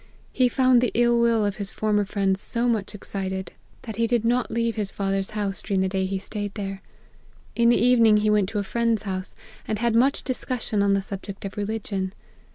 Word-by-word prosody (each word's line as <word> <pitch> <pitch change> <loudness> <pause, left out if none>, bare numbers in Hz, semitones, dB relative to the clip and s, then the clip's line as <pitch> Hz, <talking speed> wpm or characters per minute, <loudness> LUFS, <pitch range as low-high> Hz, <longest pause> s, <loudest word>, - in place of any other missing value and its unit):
He 255 -1 +3
found 255 -1 +4
the 245 - +2
ill 240 0 +3
will 230 -2 +3
of 205 -1 -2
his 200 -2 -3
former 210 -1 +1
friends 195 -1 0
so 240 0 -1
much 215 -3 -1
excited, 190 -2 -5 0.3
that 220 -3 -7
he 230 0 +2
did 235 -1 +1
not 245 +2 +1
leave 230 -1 -1
his 205 -3 0
220 195 -1 -1
APPENDIX. 195 - -2
father's 210 -1 -2
house, 195 -1 -1
during 195 -2 0
the 190 - +2
day 190 0 -1
he 195 0 -2
staid 205 +1 -5
there. 195 -2 -5 0.7
In 235 0 +4
the 240 - +5
evening 230 -3 +5
he 210 0 +2
went 205 -3 +2
to 215 - -4
a 205 - 0
friend's 230 +1 0
house, 185 -2 -5 0.3
and 215 - -1
had 235 +1 +1
much 255 +5 +3
discussion 250 -5 -2
on 200 0 +3
the 195 - -1
subject 195 0 -7
of 195 - -6
religion. 200 -2 -3
210 Hz, 220 wpm, -24 LUFS, 195-235 Hz, 0.7 s, the